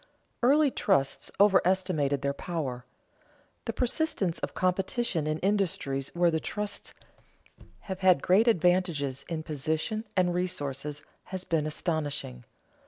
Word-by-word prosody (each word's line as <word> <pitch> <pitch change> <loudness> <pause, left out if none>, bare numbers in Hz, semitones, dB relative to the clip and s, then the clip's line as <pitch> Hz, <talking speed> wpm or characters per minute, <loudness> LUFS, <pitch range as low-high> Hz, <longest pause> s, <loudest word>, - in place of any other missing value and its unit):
_ - - -27 0.4
Early 280 +3 +5
trusts 135 - +1
overestimated 185 -8 +3
their 140 0 +1
power. 140 -7 -4 0.8
The - - -1
persistence 245 - 0
of - - -5
competition 185 -2 0
in 155 0 0
industries 175 -9 0
where 175 0 +4
the 160 - 0
trusts 210 +4 -5 0.9
have 190 -2 -6
had 185 -6 +4
great 200 +6 +4
advantages 175 - +2
in 160 -2 -3
position 160 +8 -2
and 180 -1 +3
resources 150 -5 -3 0.2
has 185 -1 -6
been 155 -4 0
astonishing. 150 - -3
175 Hz, 120 wpm, -28 LUFS, 145-190 Hz, 0.9 s, Early